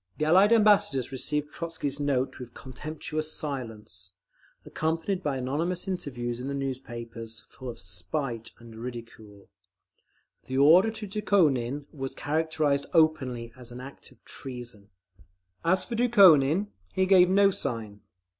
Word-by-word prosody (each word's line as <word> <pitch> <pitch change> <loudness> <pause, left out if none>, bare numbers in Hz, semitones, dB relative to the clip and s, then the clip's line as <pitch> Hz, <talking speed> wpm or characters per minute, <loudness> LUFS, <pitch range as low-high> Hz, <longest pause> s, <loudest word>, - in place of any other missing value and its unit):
The 155 - 0
Allied 190 +7 +5
Ambassadors 205 - +4
received 150 +3 -2
Trotzky's 160 -4 -4
note 140 -2 0
with 125 -1 -10
contemptuous 155 +3 -4
silence, 110 - -6 0.5
accompanied 165 +4 -2
by 145 -6 -1
anonymous 160 +9 -2
interviews 120 -10 -3
in 125 - -5
the 140 - -3
newspapers, 120 -4 -6
full 130 -1 -9
of 120 - -7
spite 100 +7 -4
and 115 -1 -13
ridicule. 115 -4 -9 1.0
The 130 - -3
order 165 +10 +7
to 220 -1 -6
Dukhonin 150 - +1
was 135 -3 -5
characterised 155 -2 0
openly 130 -8 +2
as 125 -2 -10
an 120 - -8
act 135 +2 -10
of - - -24
treason…. 120 -6 -8 0.7
As 185 +2 +2
for - - -6
Dukhonin, 200 - +5 0.2
he 190 - +2
gave 185 -2 +6
no 200 +1 +5
sign. 110 - -4
140 Hz, 130 wpm, -27 LUFS, 120-165 Hz, 1.0 s, order